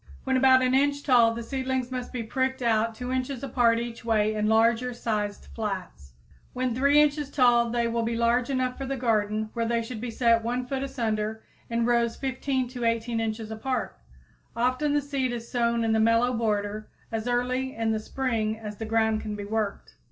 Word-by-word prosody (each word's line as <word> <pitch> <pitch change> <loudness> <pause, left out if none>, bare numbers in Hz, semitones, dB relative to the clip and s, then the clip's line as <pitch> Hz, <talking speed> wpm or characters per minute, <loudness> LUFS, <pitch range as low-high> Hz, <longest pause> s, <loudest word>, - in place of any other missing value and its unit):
When 265 0 0
about 260 0 +5
an 255 0 +2
inch 285 +1 +2
tall, 235 -4 +4
the 235 - -5
seedlings 260 0 -2
must 250 -1 -4
be 245 -3 -3
pricked 260 +3 -1
out 225 -1 +1
2 250 +2 -5
inches 260 0 -2
apart 240 -3 +3
each 235 0 -5
way 215 -2 +2
in 215 0 0
larger 230 +3 +3
sized 210 -3 -2
flats. 185 - -5 0.4
When 255 -1 -1
3 280 +4 +4
inches 295 -1 +2
tall 240 -4 +4
they 235 0 0
will 230 0 -1
be 230 +1 -1
large 235 +2 +2
enough 255 -1 -1
for 270 - -4
the 275 0 -2
garden, 215 -3 0
where 230 -1 -1
they 235 0 0
should 225 -1 -7
be 245 - -3
set 230 -1 +2
1 245 +2 -2
foot 265 +1 -3
asunder 220 -5 -2 0.3
in 230 0 0
rows 235 -1 +2
15 265 -1 -2
to 245 -1 -6
18 230 0 0
inches 220 -1 -3
apart. 235 +2 -3 0.6
Often 255 +5 +1
the 290 - +3
seed 275 -3 -2
is 235 -1 -7
sown 235 -1 +1
in 225 - +1
the 220 - +3
mellow 230 +3 +3
border 215 -2 -1 0.2
as 225 +1 -3
early 250 +2 -1
in 225 -1 0
the 220 - 0
spring 220 -2 -2
as 210 -2 -7
the 225 - -5
ground 220 0 +1
can 210 -1 -4
be 205 -1 -6
worked. 215 -1 -3
235 Hz, 200 wpm, -26 LUFS, 220-255 Hz, 0.6 s, about